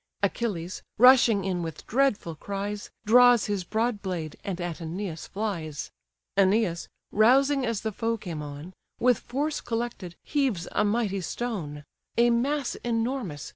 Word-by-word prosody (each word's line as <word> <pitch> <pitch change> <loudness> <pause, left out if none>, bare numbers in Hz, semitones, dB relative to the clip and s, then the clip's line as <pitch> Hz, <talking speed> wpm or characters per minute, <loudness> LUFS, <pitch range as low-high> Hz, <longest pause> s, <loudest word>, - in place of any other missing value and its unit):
Achilles, 190 -4 -2 0.2
rushing 235 -4 +6
in 185 -2 -1
with 165 -2 -6
dreadful 235 -9 +1
cries, 200 +5 -5 0.2
Draws 245 +1 +6
his 205 -3 -1
broad 220 +3 -1
blade, 170 -6 -4
and 185 -3 -4
at 175 -2 -3
Æneas 170 0 -5
flies: 175 -8 -4 0.4
Æneas 195 -3 +2 0.2
rousing 265 +5 +4
as 230 -3 -1
the 220 - -2
foe 230 +2 -1
came 170 -7 -6
on, 145 +4 -8 0.3
With 250 -1 +4
force 290 +4 -2
collected, 230 -7 -4
heaves 265 - 0
a - - +2
mighty 205 -2 0
stone: 170 -8 -4 0.3
A 240 0 +5
mass 270 +3 0
enormous! 230 - -2
210 Hz, 135 wpm, -27 LUFS, 175-240 Hz, 0.4 s, rushing